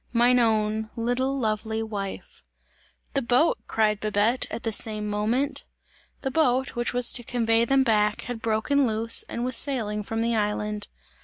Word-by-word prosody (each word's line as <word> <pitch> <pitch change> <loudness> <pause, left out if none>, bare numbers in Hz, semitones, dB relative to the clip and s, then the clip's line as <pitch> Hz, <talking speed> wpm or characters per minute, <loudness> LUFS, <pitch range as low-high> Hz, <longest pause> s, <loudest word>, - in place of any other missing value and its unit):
Mine 245 +1 +4
own, 220 -1 0
little, 245 +4 -1
lovely 220 -1 -2
wife!" 200 -3 -7 0.7
"The 275 - 0
boat!" 255 +6 +2
cried 215 -2 +1
Babette 215 +4 0
at - - -6
the 225 - -1
same 215 0 0
moment. 220 +7 -1 0.6
The 265 - -3
boat, 265 -3 +1
which 240 0 -1
was 245 -1 +4
to 240 - +1
convey 230 -1 +1
them 270 +2 +3
back, 210 -3 +1
had 245 -2 -6
broken 235 +5 +1
loose 225 +1 +3
and 235 - -3
was 255 -1 +2
sailing 225 -6 +2
from 225 +2 -4
the 235 0 0
island. 210 -1 -2
225 Hz, 160 wpm, -25 LUFS, 215-245 Hz, 0.7 s, Mine